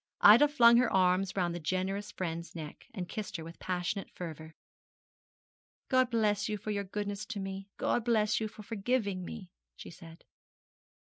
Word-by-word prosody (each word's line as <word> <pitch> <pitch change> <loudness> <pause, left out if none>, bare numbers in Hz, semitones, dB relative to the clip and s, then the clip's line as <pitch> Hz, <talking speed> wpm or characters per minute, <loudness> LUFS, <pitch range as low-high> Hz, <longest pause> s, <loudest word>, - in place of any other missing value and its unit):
Ida 230 +8 +9
flung 235 -5 +6
her 250 0 +3
arms 185 +1 +2
round 175 -3 0
that 175 - -5
generous 190 +5 -2
friend's 170 -1 -5
neck, 155 -3 -8
and 185 -6 -5
kissed 210 0 -5
her 165 - -7
with 165 +1 -11
passionate 185 +2 -3
fervour. 160 -2 -8 1.3
'God 255 -2 +3
bless 215 -4 +1
you 210 - -1
for 215 - -5
your 200 -1 -1
goodness 205 +1 -4
to 220 -3 -5
me! 195 0 -6
God 240 - 0
bless 215 -2 +2
you 220 - -2
for 215 0 -12
forgiving 205 -3 -1
me,' 185 -1 -8 0.2
she - - -10
said. 165 -1 -13
195 Hz, 170 wpm, -31 LUFS, 180-215 Hz, 1.3 s, Ida